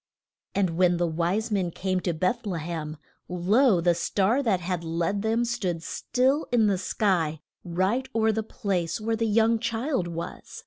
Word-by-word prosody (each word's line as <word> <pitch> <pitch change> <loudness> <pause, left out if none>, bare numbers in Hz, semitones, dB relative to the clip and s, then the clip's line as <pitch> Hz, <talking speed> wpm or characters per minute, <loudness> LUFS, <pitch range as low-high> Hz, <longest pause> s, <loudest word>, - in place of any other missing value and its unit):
And 190 -3 +2
when 180 -1 +4
the 175 - +1
wise 175 +7 -1
men 190 -4 +1
came 185 +2 -1
to 175 -1 -1
Beth 185 +7 -1
le 180 -4 -2
hem, 155 -1 -5 0.3
lo, 190 +5 +3
the 175 +1 +3
star 200 +8 +1
that 215 -9 +1
had 180 -1 -3
led 170 +5 -1
them 225 +2 +1
stood 185 -9 -2
still 265 - 0
in 235 -3 +4
the 195 -3 +2
sky, 175 -7 0 0.2
right 190 +9 0
o'er 220 -1 +3
the 220 +1 -1
place 185 -5 -2
where 225 +1 -1
the 225 0 0
young 225 +1 +3
child 230 - -1
was. 170 0 -7
190 Hz, 175 wpm, -26 LUFS, 175-225 Hz, 0.3 s, when